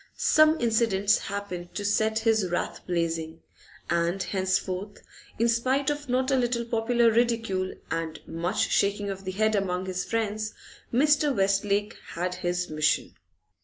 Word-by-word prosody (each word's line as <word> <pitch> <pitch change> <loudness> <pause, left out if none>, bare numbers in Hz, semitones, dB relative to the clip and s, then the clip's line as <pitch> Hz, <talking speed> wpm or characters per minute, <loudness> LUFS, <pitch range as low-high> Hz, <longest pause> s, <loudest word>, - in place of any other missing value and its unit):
Some 310 +1 +4
incidents 220 -3 +2
happened 185 -3 -6
to 205 - -3
set 220 +2 +1
his 220 -4 +2
wrath 175 - -2
blazing, 165 -2 -2 0.5
and 170 +2 0
henceforth, 190 +1 -2 0.4
in 230 - +2
spite 260 +5 +1
of 290 -2 -5
not 255 +2 +1
a - - +4
little 240 -1 0
popular 230 0 +2
ridicule 225 -5 0 0.2
and 165 -1 -3
much 170 +3 -1
shaking 200 0 +1
of 195 0 -8
the 185 - -2
head 215 +3 +1
among 190 -2 -1
his 185 -1 -2
friends, 215 -1 -2 0.4
Mr. 295 +3 +3
Westlake 200 +1 +1 0.2
had 180 +1 -1
his 180 0 -2
mission. 155 -1 0
205 Hz, 140 wpm, -27 LUFS, 180-230 Hz, 0.5 s, Some